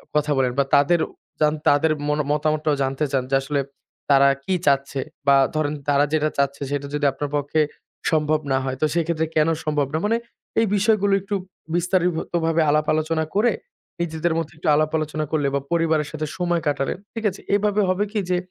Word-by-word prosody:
কথা 150 0 +1
বলেন 130 -2 +2
বা - - +5
তাদেরও 160 +4 +3 0.3
জান 150 0 +4
তাদের 150 +2 +4 0.2
মনও 150 0 +1
মতামতটাও 155 0 +1
জানতে 135 +3 -1
চান 135 -2 +1
যে - - +4
আসলে 140 +1 -1 0.5
তারা 140 0 +6 0.2
কি 190 - 0
চাচ্ছে 140 0 +2 0.3
বা 140 - +7 0.2
ধরেন 150 -1 0 0.2
তারা 145 +1 +4
যেটা 155 0 +2
চাচ্ছে 140 0 0
সেটা 145 0 -2
যদি 150 0 0
আপনার 145 +2 -4
পক্ষে 145 +2 +1 0.5
সম্ভব 155 -1 +2
না 135 - +3
হয়, 130 -1 -2
তো - - +4
সেক্ষেত্রে 165 -1 0
কেন 155 0 +4 0.2
সম্ভব 150 -2 +1
না? - - +1
মানে 230 +2 +2 0.4
এই 225 - +4
বিষয়গুলো 205 -1 +2
একটু 200 +1 -3 0.4
বিস্তারিত 180 +1 +2 0.3
ভাবে 165 0 +2
আলাপ 150 +1 +2
আলোচনা 160 +1 0
করে 230 +4 +4 0.5
নিজেদের 165 0 -1
মধ্যে 165 -2 -3
একটু 155 - -6
আলাপ 155 +1 +1
আলোচনা 155 0 -2
করলে 150 -3 +1
বা - - +2
পরিবারের 160 -3 +1
সাথে 155 -1 -4
সময় 175 -2 0
কাটালেন। 140 0 -1 0.2
ঠিক 225 -1 -5
আছে? 190 - -10
এইভাবে 205 0 +2
হবে 185 +2 +1
কি, 215 - -1
যে 180 - +2
155 Hz, 190 wpm, -22 LUFS, 145-170 Hz, 0.5 s, বা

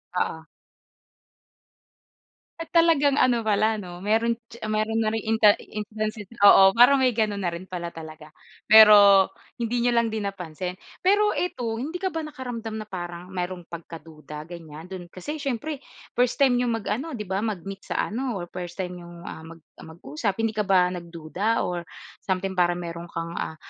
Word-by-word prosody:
Oo. - - -1 2.2
At 330 - -5
talagang 320 -4 +4
ano 250 -4 +3
pala 220 0 +1
'no, 180 -2 -9
meron 225 +3 +2 0.2
tsi 235 - -12
meron 215 +1 0
na 220 - +1
ring 225 - -3
inta 220 -2 +5
intansi 215 -1 -5 0.2
oo, 195 -1 +8
parang 250 +4 +7
may 255 -3 +2
ganun 215 -3 0
na 190 - -1
rin 170 - -7
pala 180 -2 -6
talaga. 155 -2 -11 0.3
Pero, 205 -3 +8 0.2
hindi 235 +1 -2
n'yo 240 0 +2
lang 235 -1 +2
din 215 -2 -2
napansin. 180 -1 -5 0.2
Pero 410 +3 +3
eto, 240 -10 -2
hindi 300 +8 -5
ka 375 - 0
ba 325 - -3
nakaramdam 250 -8 -6
na 220 - -4
parang 175 -3 -7
mayro'ng 180 -1 -4
pagkaduda, 160 -2 -10
ganyan? 165 +1 -11
Do'n 180 -2 -7
kasi 240 - -7
siyempre, 280 +1 -3 0.3
first 245 0 +1
time 260 -3 +3
n'yong 235 -3 -1
mag-ano 265 +10 -3
'di 210 - -4
ba, 190 -1 -2
mag-meet 195 -2 -4
sa - - -3 0.2
ano, 245 +1 -2
or 185 - -4
first 175 -1 -7
time 180 -2 -4
n'yong, 175 0 -12
ah, - - -8
mag 165 0 -12 0.2
mag-usap. 160 +4 -4
Hindi 225 - +1
ka 210 -2 -2
ba 180 -2 +4
nagduda, 175 +5 -2
or 175 -1 -4 0.3
something, 190 -1 -2
parang 175 0 +1
meron 170 0 -7
kang, 165 0 -5
ah, 160 - -4
205 Hz, 170 wpm, -25 LUFS, 175-230 Hz, 2.2 s, oo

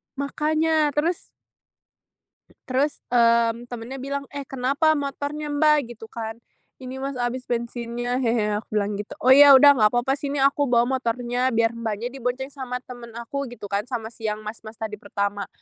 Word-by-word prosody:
Makanya, 305 +1 +1
terus 325 +4 +1 1.5
terus, 270 +3 0
eee, 235 -1 +3
temennya 245 +2 -7
bilang 275 +1 -4
"Eh 285 -1 -6
kenapa 275 +4 +1
motornya 290 +1 -3
Mbak?" 290 -5 +2
gitu 225 - -11
kan. 225 -1 -5 0.4
"Ini 260 0 -8
mas 275 0 -4
habis 245 +1 -3
bensinnya 240 +1 -2
hehe," 225 -4 +1
aku 215 - -7
bilang 205 0 0
gitu. 210 - -8
"Oh 260 - +7
ya 280 0 +10
udah 285 +2 +8
nggak 220 -6 +4
apa-apa 245 +3 +1
sini 285 -1 -3
aku 275 +1 +2
bawa 235 -1 +4 0.2
motornya 245 +1 -1
biar 230 -1 +2
Mbaknya 230 +1 -4
dibonceng 265 +1 -3
sama 260 -3 -5
temen 245 -2 -10
aku," 270 +4 -4
gitu 240 -3 -11
kan, 205 +4 -1
sama 230 -3 -4
si 225 -1 -5
yang 210 0 -4
mas-mas 215 +1 -8
tadi 215 -2 -6
pertama. 200 -1 -3
245 Hz, 165 wpm, -24 LUFS, 230-280 Hz, 1.5 s, ya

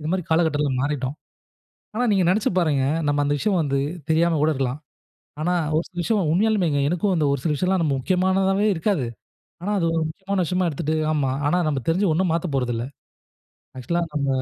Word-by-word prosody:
இந்தமாரி 175 +5 -1
காலகட்டத்தில 160 -3 +2
மாறிட்டோம். 140 -1 -2 0.8
ஆனா, 245 +3 0
நீங்க 195 -3 +3
நினைச்சு 205 +3 +1
பாருங்க! 150 -6 +2 0.2
நம்ம 145 0 +1
அந்த 145 +1 +1
விஷயம் 195 +5 +1
வந்து 140 -2 0 0.3
தெரியாம 165 +1 +3
கூட 155 - +3
இருக்கலாம். 135 -1 -2 0.6
ஆனா, 175 +3 +1 0.2
ஒரு 165 - +1
சில 180 - -19
விஷயம் 195 -7 +1
உண்மையாலுமேங்க 185 -7 +2
எனக்கும் 185 +4 0
அந்த 155 - +1
ஒரு 140 - 0
சில 155 - +1
விஷயம்லாம் 185 +3 +1
நம்ம 145 -4 +1
முக்கியமானதாவே 190 +6 +1
இருக்காது. 170 - 0 0.6
ஆனா, 205 - -2
அது 170 - +1
ஒரு 165 - +1
முக்கியமான 190 +3 -2
விஷயமா 180 +2 0
எடுத்துட்டு, 155 +2 -2 0.2
"ஆமா 140 -4 0 0.2
ஆனா 175 - +2
நம்ம 140 -3 -1
தெரிஞ்சு 180 +3 +2
ஒண்ணும் 180 +2 +1
மாத்தப் 165 -3 -2
போறதுல்ல" 120 -2 -1 0.9
ஆக்ஷூவலா 170 +7 -1
நம்ம, 145 -2 -1
165 Hz, 175 wpm, -23 LUFS, 145-185 Hz, 0.9 s, நீங்க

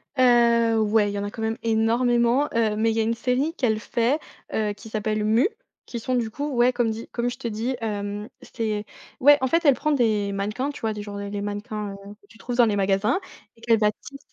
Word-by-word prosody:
Heu, 235 -3 +4
ouais, 210 -1 +2
il - - -6
y 200 - -2
en - - -3
a 205 - -4
quand 225 - -8
même 225 +1 -1
énormément, 235 +4 +2
heu, 220 -2 +2
mais 225 +1 +2
il 225 - -2
y - - +2
a - - +3
une 230 +1 +1
série 260 +7 0
qu'elle 220 -5 +1
fait, 240 +7 0 0.3
heu, 210 -1 0
qui 220 +2 -13
s'appelle: 215 0 -1
«Mu», 225 - +3 0.4
qui 235 - -6
sont 255 +2 -2
du 230 -2 0
coup, 290 +6 -4
ouais 245 +1 +4
comme 240 -2 +1
dit 225 +1 -6
comme 240 0 -1
je 245 - -7
te 245 - -5
dis, 230 +4 -2
hem, 205 -1 -4
c'était 215 -3 -3 0.4
ouais 290 +2 +8
en 260 - 0
fait 335 +5 +2
elle 285 -3 +6
prend 305 - -1
des 215 -6 +1
mannequins, 210 +8 -2
tu - - -11
vois 220 -1 0
des 210 - -6
genres 205 -1 -7
des 200 0 -5
les 205 0 -4
mannequins, 205 0 -4
heu, 200 +1 -11
que 200 - -25
tu 225 - -18
trouves 245 +1 -5
dans 240 - +6
les 210 -2 +1
magasins 195 - +1 0.4
et 230 - -23
qu'elle 230 -2 +3
va 210 -1 +3
tisse 275 +6 -13
225 Hz, 250 wpm, -24 LUFS, 210-245 Hz, 0.4 s, ouais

